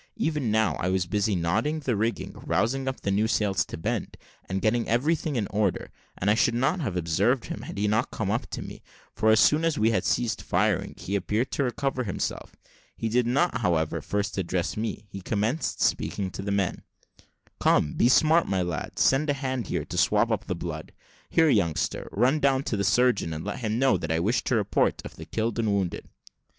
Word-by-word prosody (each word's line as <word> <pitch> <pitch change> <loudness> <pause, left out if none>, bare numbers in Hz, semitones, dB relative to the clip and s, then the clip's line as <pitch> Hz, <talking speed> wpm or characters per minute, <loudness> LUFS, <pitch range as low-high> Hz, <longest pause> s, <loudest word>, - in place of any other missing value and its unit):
Even 150 -7 0
now, 110 -6 +2
I 90 - 0
was 95 -1 +1
busy 105 +3 0
knotting 110 - 0
the 130 -5 0
rigging, 110 +3 -2
rousing 135 +3 0
up 130 - -4
new 100 +2 +2
sails 100 -5 +1
to - - -7
bend, 80 - -3 0.3
and 95 +1 -1
getting 110 +4 +1
everything 150 +5 +1
in 110 -4 0
order, 105 -2 -1 0.3
and 95 - -3
I 105 - +6
should 115 +1 +2
not 135 +9 +1
have 105 - -2
observed 80 -2 +1
him, - - -6
had - - -8
he 105 +1 +1
not 110 +2 +1
come - - -2
up - - -1
to - - -5
me; - - -10 0.3
for 110 - +2
as 110 0 +6
soon 155 +2 +4
as 165 -2 +1
we 110 +2 +3
had 110 - +1
ceased 120 -3 0
firing - - 0
he 100 - -4
appeared 105 +6 -1
to 140 - 0
recover 130 +1 -1
himself. 100 -5 -4 0.4
He 115 - -2
did 120 +1 +2
not, 135 +3 +1
however, 85 -7 0
first 100 -1 -2
address 90 -1 -1
me; 110 -1 -4
he 95 - -7
commenced 110 - -1
speaking 95 -2 0
to 95 - -6
the 100 +1 -3
men. 100 -2 0 0.8
"Come, 75 - +3
be 120 - +3
smart, 160 +5 +4
my 95 -2 0
lads; 85 -3 -2
send 140 +3 +3
a - - +3
hand 130 -5 -3
here - - -2
to - - -6
swab 105 +3 +3
up 105 -2 -1
the 95 - -1
blood. 85 -2 -6 0.4
Here, 165 -1 +4
youngster, 85 - 0
run 125 +8 +2
down 135 -1 +2
to 115 - -2
the 100 - -1
surgeon, 105 -4 +2
and 80 - -6
let 105 - -4
him 110 -2 -1
know 135 +1 +3
that 80 - -4
I 80 - +1
wish 110 +8 +1
a 130 - +2
report 105 -2 +1
of - - -8
the - - -8
killed 115 +1 -2
and 110 -2 +1
wounded." 95 -3 -2
110 Hz, 210 wpm, -26 LUFS, 95-125 Hz, 0.8 s, I